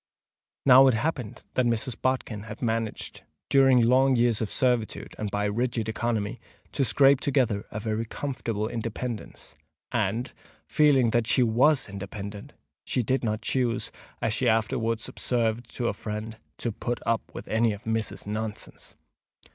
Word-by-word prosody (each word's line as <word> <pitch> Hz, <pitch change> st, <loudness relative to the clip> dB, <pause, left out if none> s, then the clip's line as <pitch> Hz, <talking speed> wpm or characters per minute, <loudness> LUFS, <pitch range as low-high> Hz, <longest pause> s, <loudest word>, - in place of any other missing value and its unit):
Now 135 Hz, 0 st, +8 dB
it 130 Hz, -, +4 dB
happened 125 Hz, -3 st, -3 dB
that 130 Hz, -1 st, +2 dB
Mrs. 120 Hz, +1 st, -1 dB
Bodkin 125 Hz, -5 st, -1 dB
had 110 Hz, -, -8 dB
managed, 115 Hz, -2 st, -2 dB, 0.3 s
during 135 Hz, -3 st, +6 dB
long 130 Hz, +3 st, +4 dB
years 120 Hz, -2 st, +2 dB
of 110 Hz, -, -1 dB
servitude 125 Hz, -4 st, 0 dB
and 105 Hz, -, -2 dB
by 105 Hz, +1 st, -1 dB
rigid 115 Hz, +1 st, -1 dB
economy, 110 Hz, -1 st, -2 dB, 0.3 s
to 140 Hz, -, 0 dB
scrape 135 Hz, +3 st, +5 dB
together 125 Hz, -8 st, 0 dB
a 105 Hz, -, -5 dB
very 110 Hz, +1 st, -2 dB
comfortable 115 Hz, -4 st, -3 dB
independence; 115 Hz, 0 st, -5 dB, 0.4 s
and, 120 Hz, +3 st, -1 dB, 0.3 s
feeling 135 Hz, -6 st, +4 dB
that 120 Hz, -1 st, +1 dB
she 125 Hz, +1 st, +4 dB
was 130 Hz, +5 st, +3 dB
independent, 100 Hz, +1 st, -7 dB, 0.3 s
she 125 Hz, -, 0 dB
did 130 Hz, +4 st, 0 dB
not 110 Hz, -1 st, -1 dB
choose, 125 Hz, -2 st, 0 dB, 0.3 s
as 110 Hz, -, +1 dB
she 120 Hz, +1 st, +2 dB
afterwards 115 Hz, +1 st, 0 dB
observed 115 Hz, -1 st, -1 dB
to 120 Hz, -, 0 dB
a -, -, 0 dB
friend, 110 Hz, +1 st, -6 dB, 0.2 s
"to 120 Hz, -, -2 dB
put 120 Hz, +3 st, -3 dB
up 115 Hz, -1 st, +2 dB
with -, -, -7 dB
any 115 Hz, +1 st, +2 dB
of 105 Hz, +3 st, -8 dB
missus's 110 Hz, -1 st, -2 dB
nonsense." 105 Hz, +1 st, -6 dB
115 Hz, 150 wpm, -27 LUFS, 110-125 Hz, 0.4 s, Now